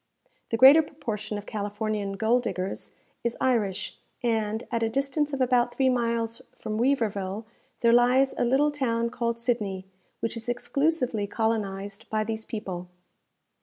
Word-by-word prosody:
The 225 - 0
greater 270 +6 +9
proportion 215 -9 -5
of 205 - -7
Californian 210 -1 -3
gold 220 +5 +2
diggers 190 -4 -4 0.3
is 235 0 -1
Irish; 210 -6 0 0.2
and, 220 -1 0
at 230 -1 0
a 225 - +2
distance 275 +4 0
of 275 -2 -2
about 245 -1 +2
three 265 -1 +3
miles 230 -2 0
from 215 0 -4
Weaverville, 215 -5 0 0.4
there 235 0 +5
lies 250 +3 +4
a - - 0
little 270 +5 +3
town 235 -5 0
called 235 -1 -2
Sidney, 210 -6 -1 0.3
which 230 - -2
is 230 +1 -6
exclusively 250 -3 0
colonized 205 -3 -2
by 215 0 +1
these 220 0 -4
people. 185 -5 -5
230 Hz, 145 wpm, -27 LUFS, 210-250 Hz, 0.4 s, greater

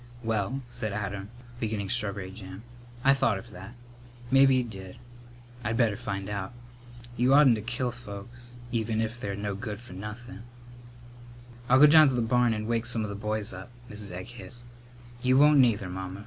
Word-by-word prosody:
"Well," 115 +4 -1
said 110 -3 -4
Adam, 100 -1 -4 0.3
beginning 105 -4 -2
strawberry 100 -5 -2
jam, 95 0 -10 0.4
"I 135 - +6
thought 115 -6 +2
of 95 - -11
that. 95 +7 -10 0.6
Mebbe 135 +1 +7
he 130 -1 +3
did. 95 -3 -9 0.7
I'd 110 +1 -1
better 115 -4 +3
find 100 -1 -4
out. 100 +1 -4 0.6
Y'oughtn't 130 +2 +6
to 110 - -2
kill 125 +2 -2
folks 120 +2 -10 0.2
even 110 -1 -1
if 115 +2 -2
they're 100 -4 -3
no 100 0 -3
good 105 0 -5
for 120 -6 -13
nothin'." 105 +2 -8 1.3
"I'll 130 - +6
go - - +11
down 155 0 +8
to 135 - +1
the 120 - +1
barn 120 +1 +3
and 110 -1 -2
wake 115 0 -1
some 115 -2 0
of 105 - -4
the - - -5
boys 105 0 -3
up," 95 +4 -9 0.2
Mrs. 105 -2 -7
Egg 90 +1 -6
hissed. 120 0 -10 0.6
"You 130 0 +3
won't 150 +1 +6
neither, 110 -6 +3
Mamma. 95 +1 -6
110 Hz, 175 wpm, -28 LUFS, 100-120 Hz, 1.3 s, go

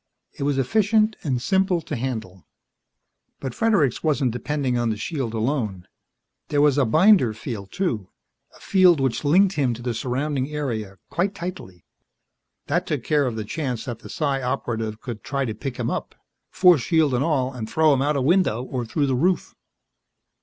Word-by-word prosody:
It - - -12
was 140 0 0
efficient 215 - +2
and 130 -5 0
simple 190 +7 +1
to - - -5
handle. 110 -7 -5 0.9
But 130 -3 -5
Fredericks 185 - +2
wasn't 140 -5 +1
depending 130 +1 -2
on 120 -1 +1
the 110 - -2
shield 125 -2 -3
alone. 110 -6 -2 0.6
There 145 - 0
was 145 -1 +4
a 135 - +4
binder 155 - +4
field, 105 -4 -6
too 115 - -2 0.5
a - - -20
field 185 -5 +4
which 135 0 0
linked 185 +6 +3
him 130 -5 +1
to 120 - -10
the 120 -1 -1
surrounding 130 +3 -2
area, 115 -10 -4
quite 190 +3 0
tightly. 165 - -7 0.8
That - - -1
took - - -2
care 145 -3 +2
of 120 - -3
the 110 -1 -4
chance 125 -3 -3
that 120 -4 -5
the - - -12
Psi 140 -3 -1
Operative 115 -4 -2
would 115 -5 -6
try 140 -1 -2
to 110 - -3
pick 125 +4 -6
him 120 -2 -2
up, - - -4 0.3
force 180 -7 +5
shield 155 +2 +2
and 125 +2 +1
all, 135 -5 0
and 110 -3 -6
throw 155 +1 +4
him 135 - +1
out 145 +2 +1
a 135 - 0
window 155 - +2
or 130 -2 -4
through 145 +5 0
the 135 - 0
roof. 175 +8 0
135 Hz, 180 wpm, -23 LUFS, 120-155 Hz, 0.9 s, force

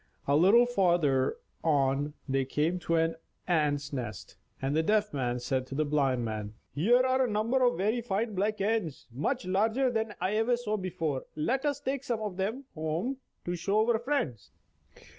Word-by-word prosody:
A 140 - +3
little 200 +10 +6
farther 175 - +2 0.3
on 145 -1 +1
they 135 0 +1
came 155 +7 0
to 165 -1 0
an 165 0 +1 0.3
ant's 150 -4 +1
nest, 120 -7 -5 0.2
and 135 +2 -1
the 160 - +4
Deaf 210 +3 +1
Man 125 -3 -1
said 130 +1 -1
to 135 - -6
the 155 +2 +1
Blind 135 -5 +1
Man: 110 -1 -4 0.2
"Here 235 - +4
are 260 0 +3
a 250 - 0
number 220 +5 +1
of 245 -7 +3
very 215 +6 +1
fine 220 0 -1
black 210 +3 0
ants, 200 -8 -1
much 170 - -2
larger 220 +8 +2
than 220 -2 0
any 210 - -11
I 185 - 0
ever 240 +2 +2
saw 220 -3 -2
before. 165 -8 -2
Let 255 - 0
us 285 -1 0
take 275 -1 -2
some 235 -4 -2
of 205 -4 -4
them 220 +8 -2
home 160 - -2 0.3
to 175 - -1
show 200 +6 +1
our 225 - +1
friends." 235 - -2
180 Hz, 185 wpm, -30 LUFS, 145-225 Hz, 0.3 s, little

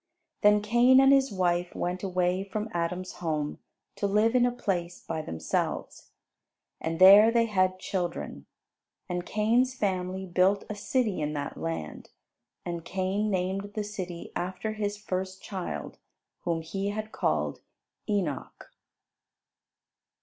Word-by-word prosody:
Then 210 0 +5
Cain 240 +4 +6
and 270 +1 +7
his 270 0 +3
wife 175 -2 0
went 180 +1 -2
away 185 -1 0
from 210 +2 -4
Adam's 175 +2 -2
home 155 -3 -2 0.4
to 200 - 0
live 210 +3 +3
in 245 -1 +4
a - - 0
place 180 -7 -2
by 160 -1 -4
themselves, 80 - -3 0.7
and 165 0 -2
there 200 +4 +9
they 230 0 +3
had 185 -4 +1
children. 180 -2 -4 0.6
And 180 -1 -3
Cain's 235 +5 +2
family 190 -3 -2
built 190 +2 +2
a - - -4
city 210 -2 0
in 150 0 -1
that 145 -1 -4
land; 165 - -5 0.6
and 170 -1 -4
Cain 190 +4 -1
named 195 +1 -2
the 215 - -1
city 185 -5 -6
after 185 +4 -3
his 205 -1 -2
first 190 -2 -4
child, 190 -3 -5 0.5
whom 165 -2 0
he 195 +4 -3
had 215 +1 -4
called - - -1 0.5
Enoch. 185 -9 -3
190 Hz, 135 wpm, -28 LUFS, 175-210 Hz, 0.7 s, there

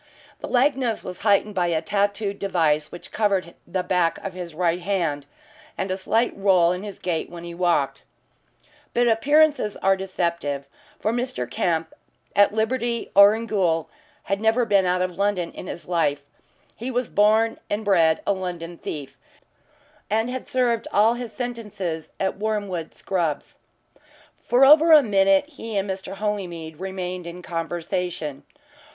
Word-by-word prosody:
The - - -6
likeness 255 -3 +1
was 180 -1 -7
heightened 205 0 +2
by 180 -3 +1
a 165 -2 +1
tattooed 200 +3 -1
device 160 -6 +1
which 175 - -11
covered 195 -5 0
the 185 +1 -2
back 180 -2 +1
of 195 - -4
his 175 -3 -7
right 175 0 +1
hand, 170 -7 -1 0.5
and 190 - -2
a - - 0
slight 225 +5 0
roll 185 -4 +4
in 180 +1 -3
his 205 -1 -7
gait 170 -3 -2
when 170 -1 -9
he 170 0 -7
walked. 175 0 0 0.9
But 240 0 +3
appearances 285 0 +3
are 195 0 +3
deceptive, 170 -7 -2 0.3
for 220 - 0
Mr. 250 +2 -2
Kemp, 165 -6 -1 0.4
at 205 0 +5
liberty 235 +2 -1
or 200 +2 +8
in 225 +1 -4
gaol, 175 -7 0 0.3
had 195 +1 -2
never 225 +2 +3
been 200 -4 +3
out 180 0 +1
of 185 0 -4
London 200 -4 0
in - - -9
his 175 - -7
life. 155 -5 0 0.5
He 240 +3 -5
was 250 -1 -1
born 220 +2 +3
and 210 +1 -2
bred 165 -5 +3
a - - +2
London 175 -3 -6
thief, 145 -3 -7 0.9
and 225 +3 0
had 260 0 -5
served 240 -3 0
all 215 +3 +4
his 240 -2 -6
sentences 210 - -5
at 190 0 -1
Wormwood 205 -6 -3
Scrubbs. 170 -6 -3 0.8
For 250 +3 +5
over 315 +3 +7
a 300 -2 +8
minute 195 -1 +3
he 230 -8 -6
and 195 +1 0
Mr. 190 0 -5
Holymead 175 -6 -4
remained 185 -2 -5
in 175 +1 -8
conversation. 165 -3 -3
195 Hz, 155 wpm, -23 LUFS, 175-220 Hz, 0.9 s, or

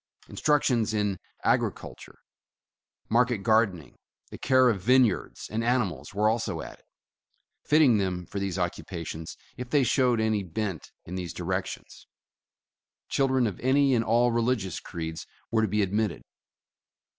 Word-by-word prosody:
Instruction 140 -6 +2
in 100 -3 -1 0.2
agriculture, - - -2 0.9
market 120 -2 +2
gardening, 110 -8 +1 0.3
the - - -8
care 130 -1 +4
of 105 -6 +1
vineyards 120 -5 +2
and 110 +2 -3
animals 100 - -1
were 105 +2 +1
also 110 -7 -1
added, - - -12 0.8
fitting 145 -8 +5
them 90 -2 -2
for 100 - -5
these 95 -2 -3
occupations 85 -2 -5 0.2
if 125 0 -6
they 140 +1 +3
showed 125 -1 +2
any 110 -2 +1
bent 95 -1 -4
in 90 - -8
these 90 -3 -4
directions. 95 +2 -5 1.0
Children 130 -2 +2
of 100 -5 -3
any 135 +1 +3
and 115 -2 +2
all 120 +2 +3
religious 115 -5 0
creeds 80 -1 -6 0.2
were 115 -1 +2
to 110 - +2
be 105 +1 +1
admitted. 100 -1 -1
110 Hz, 135 wpm, -27 LUFS, 95-125 Hz, 1.0 s, fitting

